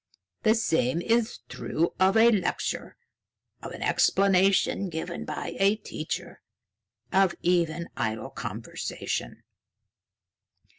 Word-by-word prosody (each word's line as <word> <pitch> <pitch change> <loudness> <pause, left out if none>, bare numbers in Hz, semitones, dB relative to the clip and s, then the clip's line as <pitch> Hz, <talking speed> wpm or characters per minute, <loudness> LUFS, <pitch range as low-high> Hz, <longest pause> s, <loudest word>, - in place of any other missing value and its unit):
The 220 -1 +4
same 160 - +1
is 230 +5 0
true 170 +2 -2
of 190 +3 +4
a 230 +1 +7
lecture, 195 -6 -2 0.6
of - - -7
an - - -6
explanation 195 0 +3
given 170 +1 -5
by - - -5
a 200 +2 +4
teacher, 220 - -6 0.7
of 190 -2 +4
even 170 -1 +1
idle 110 +4 -3
conversation. 115 -3 -5
180 Hz, 100 wpm, -27 LUFS, 160-200 Hz, 0.7 s, a